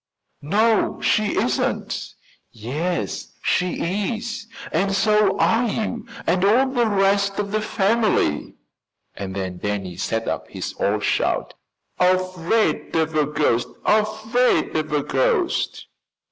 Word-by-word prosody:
"No, 215 +8 +2
she 215 -1 +1
isn't." - - -1 0.4
"Yes, 150 +11 -3
she 185 +4 0
is, 225 -1 -6 0.2
and 195 +4 +1
so 210 -1 +3
are 235 +2 +3
you 225 +1 -3 0.2
and 180 +2 +1
all 245 +7 +4
the 240 -3 +1
rest 200 -1 +2
of 200 -1 -2
the 215 0 0
family." 210 - +1 0.6
And 95 -1 -6
then 95 -2 -4
Danny 100 -4 -3
set 115 +3 -2
up - - -3
his - - -5
old 105 +1 0
shout: - - 0 0.5
"Afraid 185 +3 +1
of 160 -1 +1
a 150 -2 +2
ghost! 145 -5 +1 0.2
Afraid 220 +3 +2
of 155 -1 -1
a 150 -1 +1
ghost!" 450 - 0
195 Hz, 120 wpm, -22 LUFS, 150-220 Hz, 0.6 s, all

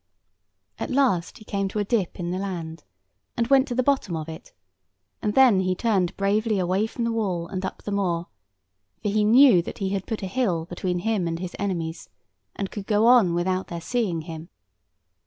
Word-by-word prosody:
At - - -3
last 255 -11 +1
he 215 - -15
came 195 -1 -1
to 195 - -5
a 210 - +2
dip 200 -4 -1
in 175 0 -3
the 185 - -2
land, 170 -4 -5 0.5
and 235 - +2
went 270 0 +5
to 245 - -3
the 255 - +2
bottom 265 -10 +1
of 155 0 -5
it, 160 0 -9 0.7
and 210 -1 -1
then 255 -7 +6
he 185 -1 0
turned 190 -4 0
bravely 210 +2 +1
away 185 +3 +1
from 235 - -4
the 230 - 0
wall 190 -7 -1
and 185 +1 -5
up 190 - -5
the 205 - -4
moor; 175 -4 0 0.8
for 210 - 0
he 210 +1 +2
knew 230 -3 +7
that - - -8
he 195 -2 -2
had 195 -1 -3
put 220 -2 -4
a - - -1
hill 185 -6 0
between 180 +1 -3
him 205 -1 0
and 165 0 -2
his 180 0 -6
enemies, 170 -5 -3 0.5
and 195 -1 -4
could 205 -2 -7
go 210 +1 +3
on 235 -8 +5
without 185 +2 -1
their 170 - -5
seeing 190 -4 -1
him. 160 +1 -8
195 Hz, 205 wpm, -25 LUFS, 175-220 Hz, 0.8 s, knew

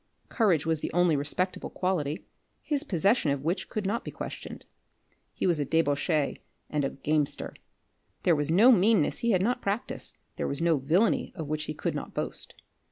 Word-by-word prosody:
Courage 185 - +2
was 160 -1 +1
the - - -4
only 175 -2 +4
respectable 150 +6 -1
quality, 165 -5 -2 0.4
his 290 -2 0
possession 195 - +2
of 140 -1 -1
which 170 +5 -1
could 215 -2 -3
not 225 +5 -1
be - - -6
questioned. - - -7 0.7
He - - -3
was 175 -4 +2
a - - +2
debauchee 150 0 +1 0.3
and 150 -1 0
a 135 - +1
gamester. 150 +1 -1 0.7
There 170 - +4
was 150 0 -1
no 210 +10 +7
meanness 210 -5 +4
he 235 - 0
had 185 -4 +3
not 245 +3 0
practised, 200 +4 -3 0.2
there - - -1
was 140 - -2
no 165 -2 +3
villainy 165 - +1
of 160 -5 -5
which 155 +1 -2
he 155 - -5
could - - -2
not - - -6
boast. - - -3
165 Hz, 180 wpm, -28 LUFS, 150-200 Hz, 0.7 s, no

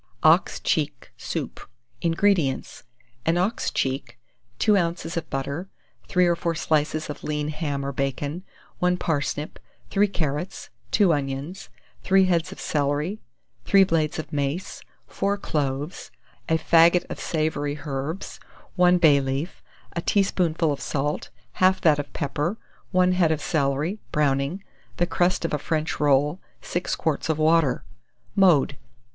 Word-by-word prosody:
OX - - +4
CHEEK - - -1
SOUP. - - -5 0.4
176. - - -5
INGREDIENTS. 165 -5 +1 0.4
An 165 +1 +3
ox 195 +6 0
cheek, 135 -1 -2 0.4
2 210 - +4
oz. 170 -2 -1
of 165 -2 -3
butter, 140 +7 -3 0.4
3 180 0 +3
or 175 -1 +3
4 170 0 -2
slices 155 0 0
of 150 - -7
lean 150 0 -2
ham 145 -3 -3
or 140 - -2
bacon, 140 +5 -3 0.4
1 180 0 +2
parsnip, 145 -2 -2 0.3
3 205 +1 +4
carrots, 160 -2 -3 0.2
2 195 -5 +4
onions, 145 +5 -4 0.3
3 190 0 +4
heads 175 0 +1
of - - -10
celery, 150 +7 -1 0.4
3 195 -1 +6
blades 165 -5 0
of 155 - -6
mace, 145 +6 -2 0.2
4 200 +1 -1
cloves, 145 -2 -3 0.4
a 160 - +4
faggot 170 +2 +5
of - - -6
savoury 155 -2 -1
herbs, 145 +5 -4 0.4
1 180 0 +5
bay 150 -5 +5
leaf, 135 +6 -3 0.3
a 170 - -1
teaspoonful 170 -5 +1
of 140 - -7
salt, 145 +1 -2 0.3
half 185 0 +5
that 150 -3 +4
of 145 - -5
pepper, 150 +7 -2 0.3
1 185 0 +3
head 180 -3 +3
of 155 - 0
celery, 150 +6 0
browning, 145 +5 0 0.3
the 175 - +2
crust 175 0 +1
of 165 - -2
a 150 - +1
French 155 +1 -2
roll, 145 +4 +2 0.2
6 175 - -2
quarts 160 0 -1
of 160 - +1
water. 155 -4 +3 0.5
Mode. 170 -9 +4
160 Hz, 140 wpm, -24 LUFS, 145-180 Hz, 0.5 s, 3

